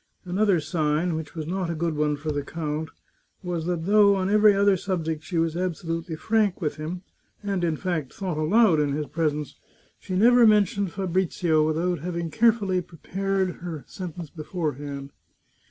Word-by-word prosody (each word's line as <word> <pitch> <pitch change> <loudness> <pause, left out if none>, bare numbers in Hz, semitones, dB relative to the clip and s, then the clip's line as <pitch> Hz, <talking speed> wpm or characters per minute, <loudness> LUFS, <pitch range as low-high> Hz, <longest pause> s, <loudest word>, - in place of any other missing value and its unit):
Another 190 0 +2
sign, 155 +1 0
which 160 -1 -5
was 160 -2 -4
not 180 +1 -2
a 170 - -2
good 165 0 -1
one 150 0 +1
for 155 +1 -3
the 145 -1 -1
count, 155 +1 -4 0.5
was 175 -2 -3
that 170 -2 -2
though 200 0 +5
on 190 0 0
every 210 -1 +6
other 200 0 +4
subject 165 -4 -3
she 175 - -4
was 165 0 +1
absolutely 165 -2 -3
frank 215 +2 +1
with 155 -5 -2
him, 170 +4 -5 0.4
and, 195 -3 -1
in 165 -2 +1
fact, 160 -7 -2
thought 185 -4 -4
aloud 180 +1 +4
in 145 -2 +1
his 150 +1 -2
presence, 150 -2 -2 0.4
she 185 - -5
never 235 +4 +6
mentioned 200 -3 +3
Fabrizio 180 -4 +1
without 170 +2 0
having 170 0 -4
carefully 210 -3 +2
prepared 190 +2 -2
her 165 -4 -6
sentence 175 -4 -7
beforehand. 145 -4 -4
170 Hz, 165 wpm, -25 LUFS, 155-190 Hz, 0.5 s, every